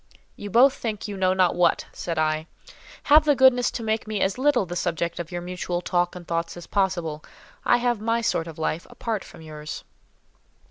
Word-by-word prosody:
"You 205 - -7
both 255 +6 +6
think 220 -3 -4
you 205 - -5
know 185 -1 +2
not 185 -2 +3
what," 175 -1 +2
said 170 -2 -4
I. 155 0 0 0.6
"Have 305 +2 +6
the 295 -2 +3
goodness 260 -2 +5
to 230 - -5
make 220 0 -1
me 215 -1 -2
as 190 +5 0
little 270 -6 +3
the 175 0 -6
subject 170 -1 -2
of 170 0 -5
your 175 0 -4
mutual 180 0 -3
talk 175 0 0
and 175 -2 -10
thoughts 165 0 -2
as 175 - -9
possible. 175 -6 -1 0.4
I - - +5
have 240 -3 0
my 230 +1 +1
sort 170 -7 0
of 160 - -9
life 160 +1 -2
apart 225 -4 -3
from 160 - -13
yours." 150 -1 -7
180 Hz, 200 wpm, -24 LUFS, 170-225 Hz, 0.6 s, both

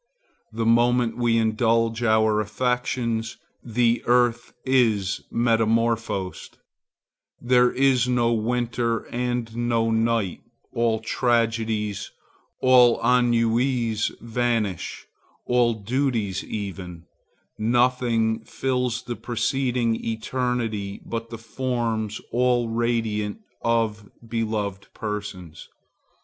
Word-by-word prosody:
The 115 +1 -2
moment 120 +1 +3
we 120 -1 +2
indulge 115 +1 +1
our 110 -2 +3
affections, 115 0 -1 0.3
the 120 0 +1
earth 120 0 +2
is 110 -7 +2
metamorphosed; 115 -4 0 0.8
there 125 0 +4
is 130 -2 +3
no 120 -2 +2
winter 115 0 -1
and 120 -2 -2
no 115 -1 +1
night; 115 -4 0 0.3
all 115 -1 +1
tragedies, 115 -3 0 0.5
all 125 -2 +6
ennuis 120 -1 +2
vanish,—all 115 +1 -1
duties 110 -3 -1
even; 95 -5 -6 0.6
nothing 115 -1 +2
fills 125 -1 -2
the 120 - -5
proceeding 120 +1 -1
eternity 115 -3 -2
but 115 0 -5
the 115 - -7
forms 115 -2 -2
all 120 -1 +2
radiant 115 - -1 0.2
of 110 -3 0 0.2
beloved 110 -4 -2
persons. 100 -6 -6
115 Hz, 85 wpm, -24 LUFS, 110-120 Hz, 0.8 s, all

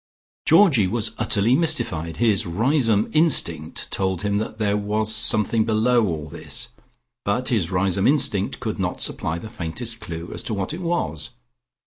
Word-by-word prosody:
Georgie 160 - +5
was 110 +2 0
utterly 110 +5 +2
mystified: 110 - 0
his 110 -4 +1
Riseholme 115 - +1
instinct 85 - 0
told 95 -2 -1
him 100 0 0
that 110 +1 -4
there 105 -2 0
was 105 +1 0
something 110 0 +3
below 115 +1 +2
all 80 -4 -4
this, - - -4 0.5
but 115 +6 -1
his 105 -9 0
Riseholme 95 +1 +2
instinct 125 -9 +1
could - - -4
not - - -2
supply 80 +1 -2
the 95 - -8
faintest 110 +4 -4
clue 85 -5 -7
as - - -3
to 110 - -3
what 100 +7 -3
it 170 - -6
was. 165 - -2
105 Hz, 155 wpm, -22 LUFS, 95-120 Hz, 0.5 s, Georgie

